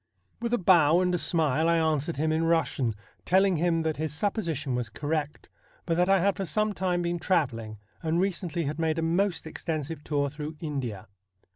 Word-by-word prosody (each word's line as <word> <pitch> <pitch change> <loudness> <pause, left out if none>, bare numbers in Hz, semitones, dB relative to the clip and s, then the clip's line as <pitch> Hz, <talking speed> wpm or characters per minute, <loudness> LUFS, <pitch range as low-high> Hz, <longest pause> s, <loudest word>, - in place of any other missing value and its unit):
' - - -41
With 235 0 -2
a 245 - +3
bow 170 -4 +5
and 180 -1 +1
a 175 - +1
smile 160 -1 +1
I 170 - +4
answered 160 -1 0
him 155 +2 +1
in 160 +1 +1
Eussian, 160 -8 +1 0.3
telling 190 -1 +3
him 165 0 +1
that 160 -1 -1
his 155 0 -2
supposition 160 - -2
was 125 -2 -2
correct, 150 +4 -3 0.4
but 165 - 0
that 180 +2 +2
I 195 0 +5
had 200 +1 +2
for 195 - -2
some 215 +6 0
time 180 -2 -1
been 170 0 -1
travelling, 120 - -1 0.2
and 165 0 0
recently 175 -3 -1
had 150 +2 -3
made 160 -1 0
a 165 - 0
most 175 +3 +1
THE 160 - -8
BLUE - - -7
STAR 165 - -2
27 - - -1
extensive 160 -3 -7
tour 145 -2 0
through 150 +1 -6
India. 135 - -4
165 Hz, 220 wpm, -27 LUFS, 150-180 Hz, 0.4 s, bow